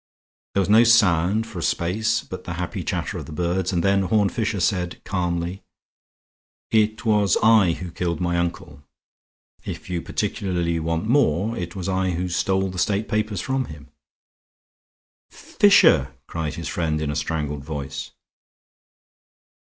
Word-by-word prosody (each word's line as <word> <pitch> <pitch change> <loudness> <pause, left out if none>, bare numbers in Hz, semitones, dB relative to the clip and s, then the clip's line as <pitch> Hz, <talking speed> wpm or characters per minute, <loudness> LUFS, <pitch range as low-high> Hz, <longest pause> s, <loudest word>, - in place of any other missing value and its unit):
There 100 - +3
was 95 - -1
no 110 +3 +6
sound 105 -2 +4
for 115 -6 -8
a - - -4
space 110 +8 0
but 95 0 -9
the 85 - -4
happy 90 +1 -4
chatter - - -3
of - - -8
the - - -9
birds, 90 +3 -1
and 85 -2 0
then 100 0 +3
Horne 100 +1 +2
Fisher 110 -1 -2
said, 90 -1 -1
calmly: 90 0 -2 1.1
"It 110 +1 +1
was 105 -3 +3
I 110 -6 +5
who 90 0 -7
killed 85 -2 -2
my 85 -1 0
uncle. 85 -4 -4 0.8
If - - -7
you 85 -1 -1
particularly 90 -3 -2
want 80 +3 -2
more, 110 - +2
it 85 -2 -5
was 95 -2 -4
I 95 -1 0
who 90 +2 -2
stole 95 +2 0
the 90 - -5
state 105 +3 0
papers 105 -3 -1
from 130 0 -1
him." 75 -4 -12 1.4
"Fisher!" 65 0 +4
cried 80 -3 -4
his 85 - -5
friend 80 -3 -1
in 75 -1 -2
a - - -4
strangled 75 -1 -3
voice. 70 -2 -5
90 Hz, 155 wpm, -23 LUFS, 85-105 Hz, 1.4 s, no